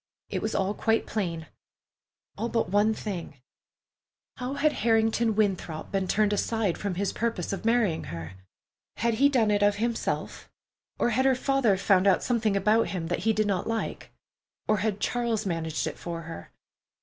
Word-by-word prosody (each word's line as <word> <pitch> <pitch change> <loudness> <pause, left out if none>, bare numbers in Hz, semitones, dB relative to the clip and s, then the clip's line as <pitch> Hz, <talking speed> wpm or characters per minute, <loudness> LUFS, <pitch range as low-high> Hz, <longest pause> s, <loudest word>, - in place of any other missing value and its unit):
It - - -2
was 220 - -2
all 195 +1 +1
quite 225 +2 +1
plain—all 180 +4 -7
but 230 -6 0
one 205 +2 +4
thing: 185 -9 -5 1.0
how 255 +2 -4
had 300 +1 +3
Harrington 225 0 +2
Winthrop 190 -7 -1
been 195 -1 0
turned 210 +2 +2
aside 210 -3 0
from 200 -3 -3
his 195 +1 -1
purpose 225 -6 -2
of 195 - -5
marrying 225 -8 +2
her? 85 +1 -7 0.6
Had 235 0 +1
he 280 - +7
done 230 -6 +2
it 205 0 +2
of 205 0 +4
himself, 230 +2 -2 0.5
or 240 - +1
had 260 +4 +2
her 265 -1 +4
father 260 -6 +2
found 195 0 +3
out 185 -3 +4
something 220 -5 +1
about 215 +4 +3
him 165 -4 -4
that 175 - -1
he - - +6
did 215 0 +1
not 195 -3 -1
like, 225 0 -3 0.6
or 215 - +3
had 210 -1 -1
Charles 235 -2 -1
managed 165 -3 -2
it 155 -2 -5
for 170 -1 -5
her? 165 - -9
210 Hz, 170 wpm, -27 LUFS, 185-230 Hz, 1.0 s, he